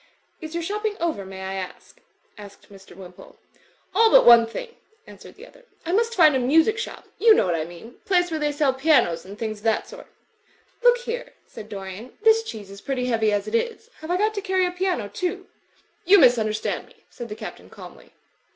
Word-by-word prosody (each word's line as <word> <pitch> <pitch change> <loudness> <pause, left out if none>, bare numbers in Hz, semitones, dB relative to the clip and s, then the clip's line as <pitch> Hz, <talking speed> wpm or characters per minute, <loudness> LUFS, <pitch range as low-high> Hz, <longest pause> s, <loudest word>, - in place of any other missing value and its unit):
"Is 315 0 -8
your 340 - -2
shopping 420 +3 -3
over, 320 - -2
may 190 0 -9
I 190 0 -5
ask?" 185 -1 -8 0.4
asked 205 -1 -14
Mr. 195 -2 -15
Wimpole. 180 -1 -14 0.6
"AJl 445 +3 +4
but - - +7
one 235 -1 +8
thing," 465 - -7 0.3
answered - - -14
the - - -13
other. - - -20 0.2
"I 335 - -2
must 460 +4 +1
find 310 -6 +5
a - - +2
music 320 - +3
shop— - - -7
you 445 -1 +6
know - - +2
what 175 - 0
I 160 -2 -2
mean. 175 +8 -13
Place 355 -2 +1
where 315 - -2
they 295 -1 0
sell 290 -2 +1
pianos 265 - +2
and 200 +2 -11
things 215 -2 -4
of 210 - -18
that 225 - +1
sort." - - -12 0.7
"Look 485 0 +5
here," 485 0 -6
said 215 -2 -12
Dorian, 195 +4 -9
"this 445 0 +5
cheese 215 - -9
is 200 0 -11
pretty 260 -2 -3
heavy 220 -2 +1
as 205 0 -1
it 215 - -7
is. 460 - -2
Have 315 - -9
I 355 - +1
got 430 +3 +1
to 405 - -4
carry 375 -2 +1
a 360 - -2
piano, 360 - -2
too?" 365 - -4 0.6
"You 390 +4 +6
misunderstand 225 - +2
me," - - -24
said 240 -1 -9
the 210 - -6
Captain, - - -10
calmly. - - -14
290 Hz, 210 wpm, -23 LUFS, -, 0.7 s, one